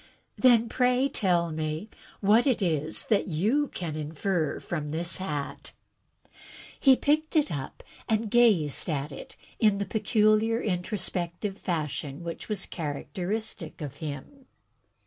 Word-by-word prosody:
"Then, 235 -3 +5
pray 250 +2 +2
tell 175 -8 +2
me 155 +4 -3 0.3
what 215 +6 +4
it 255 - +3
is 160 -5 0
that 210 - +2
you 215 - +1
can 165 - -5
infer 155 +2 -1
from 155 -4 -4
this 165 +3 -1
hat?" 150 -7 -4 1.1
He 270 -2 +7
picked 310 +4 +1
it 300 - +3
up 140 -4 -5 0.3
and 220 -1 0
gazed 205 - +3
at 145 -1 -2
it 135 - -9 0.2
in 210 -3 +4
the 200 - -1
peculiar 215 +2 +2
introspective 185 -1 -2
fashion 150 -4 -3
which 170 +5 -6
was 210 -3 0
characteristic 180 +4 -4
of 145 -2 -6
him. 155 - -7
185 Hz, 125 wpm, -28 LUFS, 155-225 Hz, 1.1 s, He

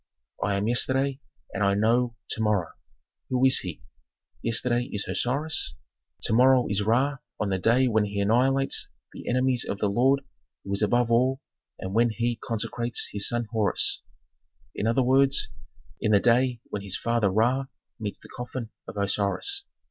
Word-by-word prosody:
"I 100 - +1
am 100 +2 -1
Yesterday 130 +3 +1 0.3
and 100 - -1
I 100 0 +3
know 115 +3 +2 0.2
To 110 - -2
morrow. 105 -6 +1 0.6
"Who 130 0 +2
is 130 - +6
he? 85 -9 -7 0.6
"Yesterday 120 +1 +1
is 105 -1 -3
Osiris, 135 - -1 0.5
To - - -1
morrow 125 +1 +5
is 105 0 +1
Ra 130 +7 +2 0.2
on 105 - -1
the 95 -1 0
day 120 +7 +3
when 110 -3 +2
he 100 0 -4
annihilates 130 +6 +2 0.2
the - - -7
enemies 125 0 +1
of - - -4
the 105 - 0
Lord 130 +6 +3 0.4
who 100 - -4
is 100 - -2
above 120 +2 +2
all 130 +3 +2 0.4
and 95 0 -6
when 120 +2 +4
he 115 +2 -1
consecrates 115 0 -2
his 100 -1 -1
son 120 0 -1
Horus. 110 -3 +1 0.7
In 105 - -2
other 115 +3 +2
words, 135 +2 +3 0.5
in 105 - 0
the 100 - +6
day 120 +1 +2
when 105 - -3
his 100 -1 -3
father 115 -3 +1
Ra 120 +7 +1 0.3
meets 105 -2 -5
the - - -13
coffin 125 -2 -6 0.2
of - - -8
Osiris. 100 - 0
115 Hz, 165 wpm, -26 LUFS, 105-130 Hz, 0.7 s, is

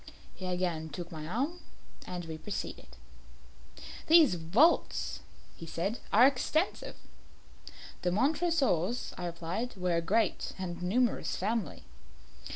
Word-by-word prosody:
He 185 - -7
again 175 -3 -1
took 170 +4 -7
my 155 -2 -6
arm, 275 - -2 0.5
and 180 -1 -5
we 160 -1 -6
proceeded. 210 - -5 1.2
"These 315 - +7
vaults," 190 - +2 0.4
he 165 - -9
said, 190 +8 -2
"are 230 +5 +7
extensive." 285 +6 0 1.1
"The 180 - +1
Montresors," 265 - +1
I 180 - -4
replied, 175 +9 -4
"were 180 -2 0
a - - +1
great 205 +4 0
and 175 -2 -5
numerous 230 +7 +1
family." 205 -4 -2
185 Hz, 115 wpm, -31 LUFS, 170-250 Hz, 1.2 s, These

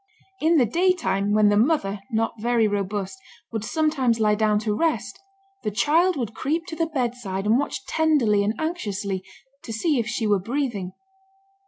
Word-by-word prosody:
In 325 +1 +3
the 255 - +5
daytime, 240 - +1
when 210 0 +4
the 205 - +3
mother, 215 -5 +1
not 225 0 0
very 235 -1 +2
robust, 205 +2 -3 0.3
would 220 -2 -3
sometimes 270 -5 +1
lie 210 -1 +3
down 210 0 +2
to 210 -1 -1
rest, 215 -10 -1 0.4
the - - -1
child 330 - +2
would 235 -4 -3
creep 320 +8 -2
to 325 - -5
the 330 0 0
bedside 240 -9 -3
and 225 +4 +4
watch 285 - -3
tenderly 280 -11 +2
and 210 +3 0
anxiously, 205 - -3 0.4
to 230 - -7
see 270 +5 +1
if 225 - -1
she 225 -1 -2
were 205 -2 +3
breathing. 225 -4 -3
225 Hz, 170 wpm, -24 LUFS, 205-300 Hz, 0.4 s, the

